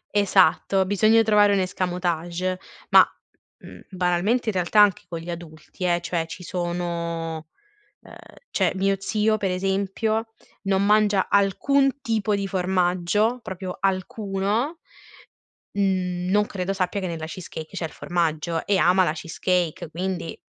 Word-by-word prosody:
Esatto, 190 -1 +3
bisogna 215 +3 +4
trovare 210 -1 +4
un 200 - +2
escamotage 180 0 -2 0.3
ma, - - +8 0.6
mhmm, - - -12
banalmente, 185 +6 0
in - - -1
realtà, 185 +3 +1
anche 205 -3 +4
con 170 - -4
gli 170 +1 -6
adulti 170 +1 -8
eh, 175 -1 +1
cioè 170 -1 -2
ci 180 - -9
sono 170 -2 -3 0.5
uhm, - - -14 0.4
cioè, - - +1
mio 195 +1 +1
zio, 215 +2 +1
per 200 -3 -1
esempio, 195 +4 -1 0.3
non 195 -1 +1
mangia 210 -2 +3
alcun 270 +8 +2
tipo 220 -4 0
di 200 -1 -1
formaggio, 185 +5 +1
proprio 185 -1 -6
alcuno, 200 - -1 0.9
mhmm, 185 -2 -1
non 210 +1 +3
credo 190 0 -3
sappia 190 +1 -1
che 190 - -2
nella 165 -2 -4
cheesecake 165 0 -8
c'è 175 - -3
il 160 - -5
formaggio, 165 -1 -2
e 200 - +2
ama 185 +1 +4
la 155 - 0
cheesecake 170 +1 -2
quindi 180 0 -4
185 Hz, 140 wpm, -24 LUFS, 175-205 Hz, 0.9 s, ma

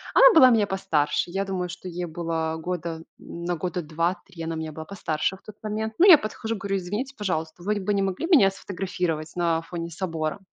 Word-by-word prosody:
она - - +9
была 260 -5 +8
меня 215 -3 +4
постарше. 165 -5 0
Я 195 +1 -1
думаю, 180 -2 -3
что 180 +1 -8
ей 175 +1 -4
было 160 -1 -2
года 170 -2 -3 0.2
на 170 +1 -4
года 180 +2 -3
2-3 170 +2 -3
она 165 0 -3
меня 160 -1 -4
была 160 +1 -8
постарше 175 -2 -2
в - - -18
тот 215 - -10
момент. 220 +1 -3
Ну, 380 - +7
я 340 -5 +11
подхожу, 220 0 -4
говорю: 195 0 -2
"Извините, 210 +10 -4
пожалуйста, 165 -4 -3
вы 210 +3 0
бы 205 +2 -1
не 200 - +1
могли 195 - -1
меня 280 - +6
сфотографировать 180 -5 -3
на 165 -2 +1
фоне 170 0 -5
собора?" 165 -1 -3
180 Hz, 200 wpm, -25 LUFS, 165-200 Hz, 0.2 s, я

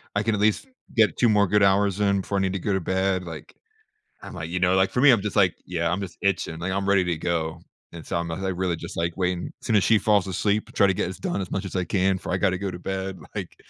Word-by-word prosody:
"I 105 - +1
can 110 -1 +1
at 100 - -2
least 110 - +1 0.3
get 110 -2 +3
2 120 - +4
more 100 -2 +4
good 105 +1 +3
hours 100 0 +3
in 100 -1 +2
before 100 +1 -3
I - - +1
need 95 0 0
to 95 - -2
go 100 +2 -1
to 95 - 0
bed," 95 +1 0
like 80 -4 -9 0.7
I'm - - -9
like, 85 -2 -6
you 90 +1 -2
know, 90 +1 +3
like, 95 0 +3
for 125 - 0
me, 145 - +8
I'm 115 -5 +3
just 105 +1 -4
like, 95 -5 +4
"Yeah, 85 -1 -1
I'm 90 - -1
just 95 -3 -7
itching." 95 -4 -1
Like, 90 +2 -3
I'm 100 +1 -1
ready 100 -2 +4
to 85 -3 -1
go 80 -1 -2 0.3
and, 85 -2 -10
so, - - -2
I'm 85 0 -2
like, 95 +3 -3
really 90 -2 0
just 85 +1 -8
like 85 0 -1
waiting 90 -1 -1
As - - -9
soon 115 - +2
as 95 - +3
she 110 - +4
falls 100 -3 +2
asleep, 100 +3 0
try 100 - +4
to 95 - +2
get - - -1
this 95 0 -6
done 100 - -2
as 95 - -5
much 95 - -2
as 95 - -7
I 90 - +1
can 95 +1 +1
before 90 - -5
I - - +2
gotta 95 -2 +1
go 100 -1 -3
to 90 - -8
bed. 95 -1 -4 0.2
Like, - - -5
95 Hz, 300 wpm, -24 LUFS, 90-100 Hz, 0.7 s, me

